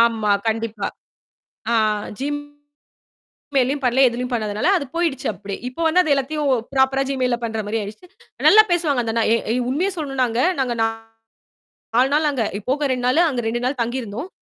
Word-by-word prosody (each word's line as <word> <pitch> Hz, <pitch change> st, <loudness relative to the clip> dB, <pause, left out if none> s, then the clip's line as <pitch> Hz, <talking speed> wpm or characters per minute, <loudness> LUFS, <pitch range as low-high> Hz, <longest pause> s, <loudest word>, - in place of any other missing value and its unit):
ஆமா. 225 Hz, -3 st, +3 dB, 0.2 s
கண்டிப்பா. 225 Hz, -2 st, -2 dB, 0.9 s
ஆ. -, -, +2 dB, 0.5 s
Gym 290 Hz, +1 st, -2 dB, 1.1 s
Gmail 265 Hz, -2 st, +4 dB
லயும் 285 Hz, +1 st, -2 dB
பண்ணல. 250 Hz, +2 st, +3 dB
எதிலயும் 245 Hz, +1 st, -4 dB
பண்ணாதுனால 215 Hz, -3 st, -1 dB
அது 325 Hz, -, -1 dB
போயிடுச்சு. 330 Hz, -7 st, -1 dB
அப்பிடி. 200 Hz, -1 st, -6 dB
இப்போ 255 Hz, +6 st, -9 dB
வந்து 325 Hz, +3 st, +4 dB
அது 315 Hz, -, -2 dB
எல்லாத்தையும் 290 Hz, +2 st, -1 dB, 0.2 s
ப்ராப்பரா 270 Hz, 0 st, +2 dB
gmail 260 Hz, -2 st, 0 dB
பண்றமாரி 220 Hz, -1 st, -2 dB
ஆயிடுச்சு. 215 Hz, -, -8 dB, 0.4 s
நல்லா 435 Hz, +1 st, +9 dB
பேசுவாங்க 320 Hz, -7 st, +1 dB
அந்த 225 Hz, -1 st, -2 dB
அண்ணா, 230 Hz, -1 st, +2 dB
எ -, -, +4 dB, 0.2 s
ஏ -, -, +1 dB
உண்மையச் 355 Hz, +9 st, 0 dB
சொல்லணுனாங்க. 260 Hz, -6 st, -1 dB, 0.2 s
நாங்க 250 Hz, -3 st, 0 dB
நா -, -, +4 dB, 1.1 s
4 255 Hz, +3 st, +4 dB
நாள் 305 Hz, +1 st, +3 dB
அங்க 255 Hz, -5 st, -1 dB, 0.3 s
போக 290 Hz, +2 st, +1 dB
2 250 Hz, -1 st, -1 dB
நாளு 255 Hz, +6 st, +3 dB
அங்க 255 Hz, -6 st, -1 dB
2 235 Hz, +2 st, -1 dB
நாள் 265 Hz, +2 st, -1 dB
தங்கி 240 Hz, +3 st, -1 dB
இருந்தோம். 230 Hz, -, -6 dB
255 Hz, 170 wpm, -21 LUFS, 230-285 Hz, 1.1 s, நல்லா